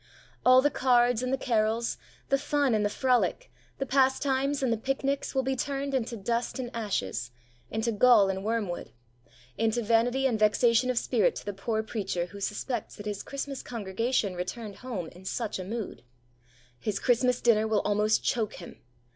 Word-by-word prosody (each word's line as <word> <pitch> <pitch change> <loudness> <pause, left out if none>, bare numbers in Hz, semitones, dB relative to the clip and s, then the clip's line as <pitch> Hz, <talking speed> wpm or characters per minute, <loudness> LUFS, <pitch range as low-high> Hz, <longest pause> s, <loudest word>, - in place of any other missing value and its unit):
All 255 +1 +7
the 290 - +3
cards 245 -2 +3
and 255 0 -2
the 270 - +1
carols, 230 -2 0 0.3
the 275 - +3
fun 290 -2 +1
and 215 -1 +2
the 205 - +1
frolic, 255 - +1 0.3
the 270 - -2
pastimes 270 +1 +1
and 245 -3 +2
the - - -1
picnics 270 +4 -2
will 265 - +2
be 265 +1 0
turned 275 +1 -3
into 240 -2 -1
dust 230 +4 -2
and 245 -2 -4
ashes, 120 - -2 0.4
into 220 +2 -1
gall 225 -2 +6
and 190 0 -2
wormwood, 210 -5 -2 0.7
into 225 +1 +1
vanity 235 +4 +2
and 235 -5 +1
vexation 230 +3 +3
of 250 - 0
spirit 230 -4 +2
to - - -7
the 205 - -3
poor 220 +3 -2
preacher 195 -6 -2
who 200 +3 -11
suspects 215 +3 -3
that 205 - -9
his 205 -1 -3
Christmas 275 -1 -5
congregation 225 -1 -1
returned 200 +4 -5
home 220 -10 -5
in 180 +2 -15
such 215 +1 -3
a - - -4
mood. 220 +2 -5 0.8
His 205 - -2
Christmas 250 0 +2
dinner 220 -2 +3
will 215 -2 +2
almost 210 +1 +1
choke 225 -4 0
him. 175 - -11
230 Hz, 175 wpm, -28 LUFS, 210-255 Hz, 0.8 s, All